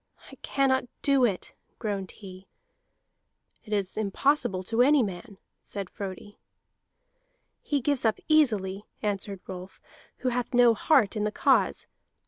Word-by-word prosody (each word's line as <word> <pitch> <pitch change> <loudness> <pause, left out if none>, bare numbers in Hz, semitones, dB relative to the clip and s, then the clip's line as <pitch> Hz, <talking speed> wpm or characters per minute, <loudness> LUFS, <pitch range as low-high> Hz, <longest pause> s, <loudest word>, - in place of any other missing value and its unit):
"I - - -11
cannot 260 -2 +1 0.2
do 275 -3 +4
it," 195 -6 -3 0.2
groaned 200 -4 -3
he. 190 -2 -11 1.2
"It 215 - -13
is 200 -2 -1
impossible 215 -1 +1
to 225 +5 +1
any 280 +1 +5
man," 200 +1 -6 0.2
said 200 -2 -6
Frodi. 200 0 -8 1.2
"He 285 -2 -1
gives 285 +1 0
up 220 -2 +2
easily," 210 -11 +2 0.2
answered 200 -2 -3
Rolf, 185 0 -9 0.5
"who - - +4
hath 245 +1 -2
no 240 -1 +6
heart 235 -2 +3
in 210 - -1
the 210 - 0
cause. - - +2
215 Hz, 130 wpm, -27 LUFS, 195-255 Hz, 1.2 s, no